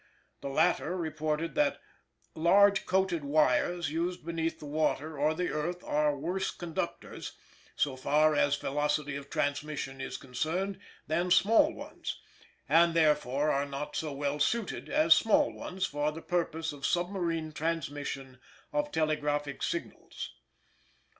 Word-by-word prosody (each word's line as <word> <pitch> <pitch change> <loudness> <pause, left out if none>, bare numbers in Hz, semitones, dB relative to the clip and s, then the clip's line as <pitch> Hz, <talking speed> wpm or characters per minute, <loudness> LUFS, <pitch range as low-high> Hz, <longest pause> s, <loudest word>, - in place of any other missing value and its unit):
The 140 - -4
latter 175 +4 +2
reported 155 0 -2
that 290 -1 +2 0.5
"large 195 +5 +4
coated 185 -4 +1
wires 150 +3 +2
used 170 +1 -2
beneath 165 -1 -2
the - - -10
water 155 +1 -1
or 155 +2 +2
the 180 +2 -1
earth 175 +4 -3
are 150 -1 +1
worse 180 +7 -1
conductors 170 -3 -5 0.4
so 140 -3 0
far 150 +4 +3
as 145 -1 +3
velocity 145 0 -1
of 140 0 -7
transmission 140 -2 -2
is - - -4
concerned 170 +9 -2 0.3
than 175 +4 0
small 225 - +5
ones; - - -7 0.5
and, 170 0 +5
therefore, 150 -2 +3
are 140 +1 0
not 140 +1 -5
so 155 -2 -2
well 145 +1 -2
suited 225 +8 -1
as 310 +1 +6
small 220 - +3
ones 185 0 -3
for 145 +1 -1
the 160 +2 -9
purposes 165 -3 -1
of 140 -1 -12
submarine 175 -2 -1
transmission 145 -4 -3 0.3
of 295 0 0
telegraphic 145 -2 -1
signals." 345 - -4
155 Hz, 135 wpm, -30 LUFS, 145-175 Hz, 0.5 s, as